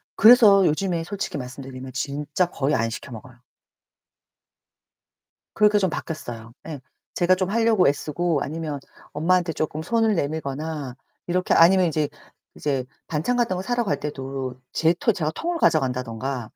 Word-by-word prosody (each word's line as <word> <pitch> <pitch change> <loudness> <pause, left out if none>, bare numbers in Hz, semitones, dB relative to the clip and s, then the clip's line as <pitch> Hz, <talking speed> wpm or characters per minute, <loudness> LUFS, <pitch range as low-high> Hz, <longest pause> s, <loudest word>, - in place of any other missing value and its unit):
그래서 210 -4 +7
요즘에 170 +1 0
솔직히 200 -4 -4
말씀드리면 130 0 -8
진짜 145 +5 -1
거의 145 -3 -1
안 115 +1 0
시켜 125 +3 -8
먹어요. 120 +2 -11 2.1
그렇게 210 0 +4
좀 190 -3 +2
바뀌었어요. 120 -9 -6
예. 150 -4 -6 0.3
제가 185 +1 +3
좀 185 0 -2
하려고 225 -4 +3
애쓰고 150 +2 0
아니면 155 -1 -4 0.3
엄마한테 170 +2 +1
쪼끔 155 0 -3
손을 225 +3 +1
내밀거나 145 -2 -3 0.3
이렇게 180 +1 +1
아니면 180 +2 +6
이제 150 -2 -1 0.5
이제 135 -3 -1 0.2
반찬 170 +11 -1
같은 230 -6 +1
거 - - -3
사러 240 +4 -1
갈 200 - -1
때도 135 -3 -5
제 165 +1 +3
토 225 +6 +1
제가 155 -3 -2
통을 340 - -3
가져간다든가 125 - 0
155 Hz, 325 characters per minute, -23 LUFS, 135-185 Hz, 2.1 s, 그래서